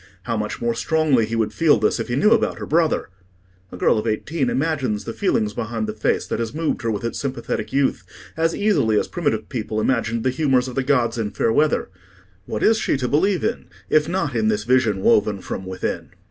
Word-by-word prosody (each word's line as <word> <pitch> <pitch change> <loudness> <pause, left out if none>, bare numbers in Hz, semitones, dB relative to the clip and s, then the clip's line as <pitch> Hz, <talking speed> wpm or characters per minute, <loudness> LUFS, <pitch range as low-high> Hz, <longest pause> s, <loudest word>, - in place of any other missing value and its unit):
How 115 +1 -2
much 105 -1 -3
more 120 0 0
strongly 135 -2 +2
he 115 - -3
would 110 -2 0
feel 160 -6 +4
this 105 0 +1
if - - -3
he 120 - -2
knew 185 +11 +4
about 230 -1 +2
her - - -5
brother! 160 -6 +1 0.6
A - - -8
girl 110 - +3
of 110 - -4
eighteen 130 +5 -1
imagines 135 -8 -1
the 115 - -5
feelings 110 - 0
behind 115 -1 -3
the 105 - -4
face 105 - 0
that - - -3
has 115 +3 -3
moved 160 0 -1
her 115 - -1
with 105 -1 -2
its 115 - -3
sympathetic 135 -1 -3
youth, 135 0 +1 0.3
as 165 +1 +1
easily 115 - +2
as - - -2
primitive 165 -5 -2
people 110 -4 -3
imagined 115 -1 0
the 130 - +2
humours 130 -2 +1
of 130 - -6
the 135 - 0
gods 125 -4 +1
in 105 -2 -1
fair 110 - 0
weather: 150 -5 +2 0.6
what 110 - -3
is 220 0 +4
she - - 0
to 130 -2 -2
believe 180 +8 +1
in, - - -2 0.3
if 155 +1 +3
not 170 -8 -1
in 110 -2 +1
this 105 -1 +1
vision 115 -5 +2
woven 105 -1 +3
from 95 0 -6
within? 95 0 -4
120 Hz, 220 wpm, -22 LUFS, 110-150 Hz, 0.6 s, feel